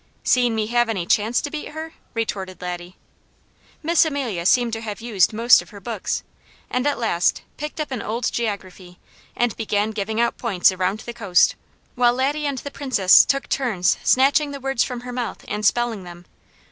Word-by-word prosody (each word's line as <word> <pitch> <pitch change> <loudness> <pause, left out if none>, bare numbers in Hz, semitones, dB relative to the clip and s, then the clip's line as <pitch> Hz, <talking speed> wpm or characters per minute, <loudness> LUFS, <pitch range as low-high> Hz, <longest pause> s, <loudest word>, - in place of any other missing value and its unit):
"Seen 245 -2 +3
me 220 -1 0
have 240 +1 +1
any 190 -6 -2
chance 220 +5 +2
to 290 - -5
beat 305 - -5
her?" 320 +1 -7 0.2
retorted 195 -5 -3
Laddie. 180 0 -6 0.9
Miss 330 +2 +4
Amelia 255 - -2
seemed 240 +1 +3
to 225 - -3
have 210 -3 -6
used 215 -7 +2
most 230 +3 +5
of - - -14
her 205 - -11
books, 215 0 -3 0.5
and 250 +3 0
at 290 - 0
last 180 -7 +1
picked 300 +2 -6
up 300 -2 -3
an 255 - -3
old 230 +3 -2
geography 190 -5 -5 0.4
and 240 -2 0
began 210 -1 0
giving 215 +1 -3
out 235 0 0
points 195 -7 +3
around 185 +3 -1
the 235 - -7
coast, 200 -7 +3 0.4
while 245 -1 +3
Laddie 290 +3 0
and 280 -2 -2
the 285 +3 -6
Princess 255 -11 +5
took 275 0 -1
turns 220 -10 +1
snatching 280 +3 +3
the 280 0 -6
words 270 -2 0
from 245 -1 -5
her 250 0 -7
mouth 245 -2 -4
and 210 0 -3
spelling 235 -3 0
them. 175 0 -11
230 Hz, 185 wpm, -22 LUFS, 200-255 Hz, 0.9 s, most